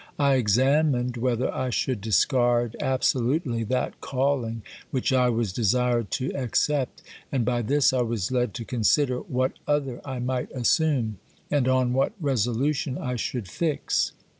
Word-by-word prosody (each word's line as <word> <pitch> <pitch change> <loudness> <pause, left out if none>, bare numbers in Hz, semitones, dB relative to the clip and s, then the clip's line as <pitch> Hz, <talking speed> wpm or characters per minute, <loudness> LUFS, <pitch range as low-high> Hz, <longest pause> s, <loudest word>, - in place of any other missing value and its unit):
I 140 -1 +3
examined 125 +2 +2
whether 125 +1 0
I 130 0 -2
should 125 -2 -1
discard 120 - +2
absolutely 130 -1 0
that 130 +4 -2
calling 130 -5 -1 0.3
which 130 0 0
I 125 -1 +4
was 115 -5 -1
desired 120 +1 +1
to 130 0 -2
accept, 135 +1 0 0.3
and 130 -4 0
by 120 -1 +1
this 140 +4 +2
I 130 - +2
was 115 -3 -2
led 125 -4 0
to 115 - -5
consider 125 +3 +1
what 130 +1 -1
other 140 -4 -1
I 130 -2 -5
might 125 0 -2
assume, 125 - +1 0.3
and 140 -4 +2
on 130 -1 +2
what 135 +1 +1
resolution 135 - 0
I 125 0 -3
should 120 -3 -3
fix. 155 - -1
125 Hz, 145 wpm, -25 LUFS, 120-135 Hz, 0.3 s, I